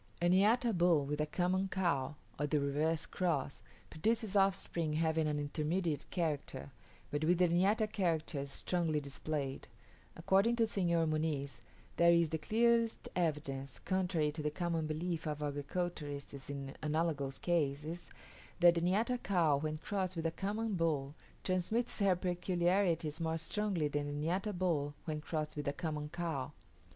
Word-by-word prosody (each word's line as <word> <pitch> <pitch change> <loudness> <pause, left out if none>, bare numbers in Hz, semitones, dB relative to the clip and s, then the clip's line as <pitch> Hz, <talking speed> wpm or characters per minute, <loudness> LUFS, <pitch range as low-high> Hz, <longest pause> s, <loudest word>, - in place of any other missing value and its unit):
A 175 - +2
niata 220 +5 +4
bull 170 -4 +4
with 150 +2 -1
a 150 - 0
common 185 +4 +1
cow, 160 -8 0 0.2
or 145 - +1
the 150 0 +2
reverse 150 +3 0
cross, 155 -7 -1 0.3
produces 215 +5 0
offspring 185 -5 +1
having 160 0 +1
an 150 -1 0
intermediate 155 +2 -1
character, 155 -5 -2 0.4
but 145 +1 -1
with 175 +3 +4
the 180 0 +4
niata 195 +6 +3
characters 165 -8 -1
strongly 165 +1 0
displayed: 140 -1 -4 0.5
according 200 +5 +3
to 230 -1 +3
Senor 170 -6 +1
Muniz, 155 -3 -1 0.4
there 170 0 +6
is 170 -2 +4
the 160 0 -2
clearest 230 +5 +2
evidence, 140 -6 -2
contrary 180 -5 0
to 155 +1 -5
the 150 - 0
common 165 0 -1
belief 165 +2 -2
of 150 0 -3
agriculturists 145 -2 -4
in 140 -1 -5
analogous 150 -3 -1
cases, 160 0 -1 0.5
that 175 -1 +8
the 170 - -1
niata 220 +8 +1
cow 170 -6 +3
when 155 +1 -2
crossed 185 +2 -2
with 165 -1 -3
a 165 - +2
common 210 +5 -2
bull 155 -6 0 0.3
transmits 190 +7 0
her 195 -3 +4
peculiarities 175 -2 +1
more 160 0 0
strongly 180 -1 -1
than 145 0 -2
the 145 - -4
niata 190 +5 0
bull 165 -6 0
when 155 -2 -3
crossed 155 -1 -3
with 145 -2 -4
a 140 - +1
common 150 -2 -3
cow. 155 -5 -3
165 Hz, 150 wpm, -35 LUFS, 150-185 Hz, 0.5 s, that